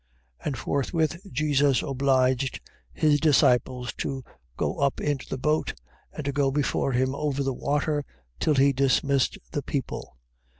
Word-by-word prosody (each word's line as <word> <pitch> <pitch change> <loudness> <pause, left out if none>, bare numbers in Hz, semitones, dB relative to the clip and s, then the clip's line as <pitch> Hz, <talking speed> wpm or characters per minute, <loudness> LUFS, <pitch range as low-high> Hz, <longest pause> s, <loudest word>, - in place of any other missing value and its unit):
14:22. - - -19
And 140 -3 -2
forthwith 160 - -1
Jesus 140 -1 +2
obliged 130 -1 +1 0.3
his 150 -2 +3
disciples 125 -5 +3
to 135 -2 -3 0.3
go - - -1
up 140 -1 +1
into 145 -2 -2
the - - -3
boat, 150 - 0 0.4
and 150 - -7
to 140 - 0
go 140 -1 +2
before 135 -1 0
him 130 +2 +1
over 140 -1 -1
the 135 -1 -1
water, 145 +3 0 0.4
till 155 - +2
he 140 +1 +4
dismissed 135 0 +2
the 145 - -2
people. 135 - -4
140 Hz, 145 wpm, -26 LUFS, 130-145 Hz, 0.4 s, he